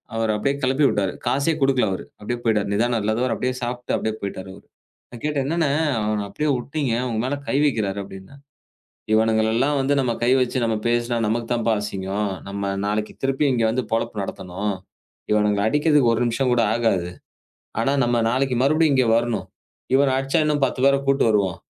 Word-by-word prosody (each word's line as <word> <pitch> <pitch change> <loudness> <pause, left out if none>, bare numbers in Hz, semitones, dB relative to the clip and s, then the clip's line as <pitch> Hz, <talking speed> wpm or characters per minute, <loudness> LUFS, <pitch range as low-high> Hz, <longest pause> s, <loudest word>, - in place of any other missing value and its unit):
அவர 115 0 0
அப்படியே 140 +6 0
கிளப்பி 130 +3 +2
விட்டாரு. 100 -2 -1
காசே 140 +4 +1
கொடுக்கல 130 -5 +3
அவரு. 95 - -4 0.2
அப்படியே 120 +3 -3
போயிட்டாரு. 105 -3 +1
நிதானம் 115 +2 +1
இல்லாதவர். 115 +3 0
அப்படியே 125 +2 -1
சாப்பிட்டு 120 0 -2
அப்படியே 110 - -2
போயிட்டாரு 95 -1 -5
அவரு. - - -16 0.5
நான் 120 - -10
கேட்டேன், 150 -3 0
"என்னன்னா, 165 -1 +1 0.3
அவன 105 -1 -1
அப்படியே 150 0 -2
உட்டிங்க. 140 -2 -2 0.2
உங்க 110 -2 -2
மேல 140 +3 -1
கை - - -1
வைக்கிறாரு" 105 -9 0
அப்படின்னா, 95 +7 -12 0.8
"இவனுங்களை 110 0 +3
எல்லாம் 140 +3 +2
வந்து 140 +2 +1
நம்ம 125 -3 0
கை 120 - +3
வச்சு 125 0 0
நாம 115 -1 0
பேசினா 120 0 0
நமக்குத் 115 +2 -1
தான்ப்பா 115 -2 +1
அசிங்கம். 100 0 -3 0.2
நம்ம 100 0 -3
நாளைக்கு 105 +1 -2
திருப்பி 135 +2 +1
இங்க 120 -2 +1
வந்து 125 +2 -1
பொழப்பு 115 -1 -1
நடத்தணும். 95 +1 -4 0.6
இவனுங்க 105 -1 +2
அடிக்கிறதுக்கு 145 -4 +3
ஒரு 115 - 0
நிமிஷம் 125 +2 0
கூட 120 - +2
ஆகாது. 100 -7 0 0.7
ஆனா, 135 +4 +1
நம்ம 120 -1 +1
நாளைக்கு 130 -1 0
மறுபடியும் 155 +1 +3
இங்க 130 -2 +3
வரணும். 120 -2 -2 0.5
இவன 135 0 +4
அடிச்சா 135 +3 +1
இன்னும் 150 -2 +1
10 130 - -4
பேரை 140 0 +5
கூட்டி 135 0 +3
வருவான் 100 -4 +1
120 Hz, 175 wpm, -22 LUFS, 105-135 Hz, 0.8 s, பேரை